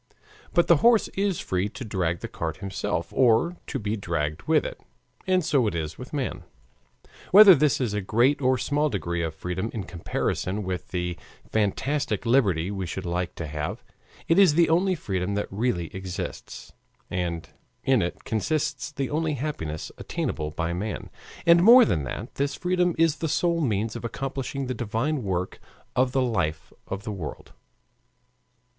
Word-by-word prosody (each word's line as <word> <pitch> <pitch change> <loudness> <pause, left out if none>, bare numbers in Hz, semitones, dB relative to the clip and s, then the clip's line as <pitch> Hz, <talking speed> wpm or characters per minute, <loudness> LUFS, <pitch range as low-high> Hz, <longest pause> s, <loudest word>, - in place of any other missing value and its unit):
But 175 - +5
the 170 - +6
horse 230 +7 +4
is 195 -3 -1
free 95 +2 -1
to 130 +4 -8
drag 90 -5 -1
the - - -4
cart 80 -1 -4
himself 90 -3 -3
or 130 +8 +3
to - - -3
be 105 +1 -2
dragged 85 -5 -2
with 155 -2 +3
it. - - -6 0.5
And 185 -3 +2
so 135 -7 +3
it 85 - -2
is 80 -1 -4
with 125 - -8
man. 140 -5 -3 0.9
Whether 200 0 +10
this 150 -2 +2
is 120 -6 -1
a 105 - -1
great 125 +9 +2
or 130 0 +3
small 145 +4 +1
degree 85 -6 -2
of 80 -1 -3
freedom 90 +6 -3
in 105 - -3
comparison 90 +3 -2
with 90 -1 -4
the 90 -1 -3 0.3
fantastic 110 +2 0
liberty 100 -8 +2
we 95 -3 -3
should 95 +3 -5
like 90 0 -2
to 85 - -5
have, 75 - -4 0.4
it 165 +3 +4
is 180 -7 +6
the 170 0 +4
only 185 +3 +3
freedom 95 - -2
that 105 - 0
really 95 -6 -1
exists, 95 -1 -6 0.4
and 85 -2 -3 0.3
in 130 -4 +3
it 85 - -3
consists 145 +6 -1
the 140 -3 -3
only 155 +1 0
happiness 80 - -4
attainable 75 0 -3
by 85 +2 -2
man. 100 +5 -4 0.3
And 170 0 +7
more 235 +5 +9
than 75 - 0
that, 105 - -6
this 140 0 0
freedom 180 -1 +1
is 165 -2 +3
the 160 +2 -2
sole 170 +2 +1
means 110 -5 0
of - - -6
accomplishing 135 +2 -4
the 130 - -2
divine 120 +6 -1
work 90 -3 -2 0.4
of 130 0 +2
the 130 0 +2
life 80 - -2
of 100 +1 -5
the 110 - -4
world. 85 -7 -7
110 Hz, 170 wpm, -26 LUFS, 90-145 Hz, 0.9 s, Whether